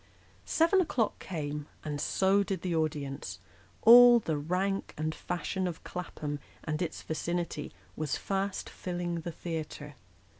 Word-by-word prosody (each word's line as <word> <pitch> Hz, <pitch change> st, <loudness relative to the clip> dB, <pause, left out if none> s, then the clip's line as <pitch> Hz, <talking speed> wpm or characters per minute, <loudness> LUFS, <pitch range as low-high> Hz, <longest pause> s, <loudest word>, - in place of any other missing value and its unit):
Seven 335 Hz, +4 st, +4 dB
o'clock 240 Hz, -, 0 dB
came, 150 Hz, -4 st, -4 dB, 0.2 s
and 145 Hz, -1 st, -3 dB
so 195 Hz, +5 st, +3 dB
did 195 Hz, -3 st, -2 dB
the 180 Hz, -2 st, 0 dB
audience; 140 Hz, -, -2 dB, 0.5 s
all 240 Hz, +1 st, +10 dB
the 165 Hz, -9 st, -1 dB
rank 180 Hz, +6 st, -1 dB
and 155 Hz, +1 st, -1 dB
fashion 180 Hz, +3 st, -2 dB
of 170 Hz, -2 st, -6 dB
Clapham 150 Hz, -4 st, -5 dB, 0.2 s
and 155 Hz, +1 st, -2 dB
its 175 Hz, -, -3 dB
vicinity 170 Hz, -1 st, -3 dB, 0.2 s
was 155 Hz, -2 st, -1 dB
fast 195 Hz, 0 st, -2 dB
filling 175 Hz, -2 st, -3 dB
the 170 Hz, -, -4 dB
theatre. 155 Hz, -3 st, -5 dB
170 Hz, 135 wpm, -30 LUFS, 155-195 Hz, 0.5 s, all